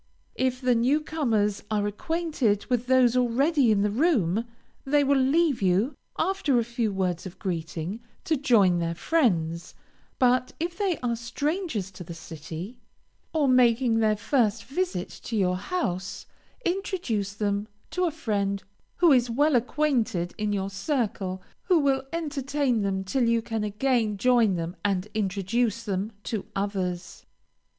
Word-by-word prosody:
If 255 -1 0
the 250 -1 +3
new 250 +6 +3
comers 230 -10 0
are 210 -1 0
acquainted 280 - -1
with 245 0 +1
those 255 -2 +4
already 255 +2 +3
in 200 -1 +3
the 210 - +1
room, 225 - +2 0.4
they 290 +1 +3
will 280 0 +3
leave 280 0 +2
you, 195 +9 +2 0.2
after 325 -7 +1
a 235 - +3
few 235 -2 -1
words 185 -2 -1
of 185 +1 -11
greeting, 170 +1 -4 0.2
to 320 - +1
join 215 - +4
their 170 0 -1
friends; 170 - 0 0.4
but 255 0 +2
if 345 +2 -2
they 390 -4 0
are 235 -1 +1
strangers 240 - -2
to 180 - -9
the 170 0 -8
city, 165 - -8 0.5
or 305 -3 +2
making 245 -2 +4
their 215 -1 +2
first 225 -2 +1
visit 275 - -2 0.2
to 230 - -3
your 180 -2 +2
house, 190 - -3 0.4
introduce 345 - -1
them 205 0 -1 0.2
to 365 0 0
a - - +2
friend 200 -9 -1 0.3
who 345 -2 +5
is 250 -3 +4
well 290 +5 +3
acquainted 240 - 0
in 210 -1 -1
your 195 -1 -2
circle, 195 -4 -2 0.2
who 365 -2 +4
will 275 -3 +2
entertain 285 -6 -1
them 195 -1 -1
till 240 +6 0
you 230 -1 +2
can 225 -2 -2
again 215 0 0
join 235 -2 +3
them 170 +1 -4
and 200 0 0
introduce 215 +3 0
them 200 0 -2
to 215 -4 -4
others. 190 -3 -3
230 Hz, 150 wpm, -26 LUFS, 195-275 Hz, 0.5 s, who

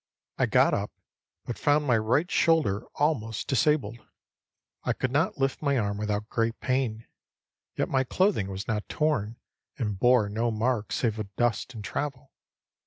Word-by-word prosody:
I - - +3
got - - +4
up, - - -1 0.6
but 120 - -5
found 150 0 +3
my 125 -4 +3
right 125 +10 +1
shoulder 145 -11 +2
almost 115 -8 0
disabled. 135 -4 +1 0.8
I - - +1
could 130 - -2
not 150 +6 +1
lift 135 -1 0
my 140 -2 +1
arm 100 -3 -1
without 105 0 -2
great 115 0 -1
pain. 125 -4 -1 0.7
Yet - - 0
my 130 -1 +1
clothing 185 - +1
was 95 +1 -5
not 105 -3 -2
torn, 120 -8 0 0.4
and 105 -6 -2
bore 120 -2 +4
no 115 +3 -1
marks 110 0 -1
save 110 -2 0
of 100 -2 -6
dust 120 +1 0
and 105 - -7
travel. 140 +2 -4
120 Hz, 160 wpm, -27 LUFS, 110-140 Hz, 0.8 s, got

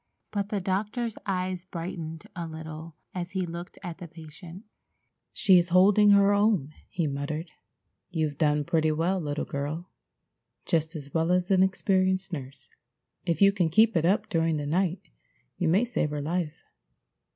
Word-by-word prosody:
But 200 -1 -2
the 210 - -1
doctor's 210 +5 -2
eyes 185 -2 -2
brightened 165 -3 -6
a 170 -1 -4
little 160 0 -8 0.2
as 180 0 -5
he 190 -2 0
looked 170 +1 -8
at 175 -2 -6
the 175 - -7
patient. 165 +3 -11 0.7
"She's 180 -5 +4
holding 200 +4 +6
her 200 0 +6
own," 200 -8 +2 0.2
he 170 - -1
murmured. 150 +3 -3 0.6
"You've 155 -5 -2
done 150 -2 +2
pretty 160 +1 +1
well, 170 +5 0
little 145 -2 -3
girl. 150 +5 -4 0.7
Just 160 +1 0
as 140 -2 -8
well 165 +1 +1
as 180 +2 +1
an 185 -1 +5
experienced 190 0 +1
nurse. 135 -5 -8 0.6
If 170 +3 +2
you 200 - +7
can 180 -4 +1
keep 220 +6 +4
it 165 - +2
up 200 +5 +2
during 165 -3 +1
the 145 - -3
night 180 +4 0 0.6
you 175 - +1
may 190 +9 +3
save 230 -10 -1
her 150 0 -3
life. 165 0 -3
175 Hz, 160 wpm, -27 LUFS, 155-190 Hz, 0.7 s, you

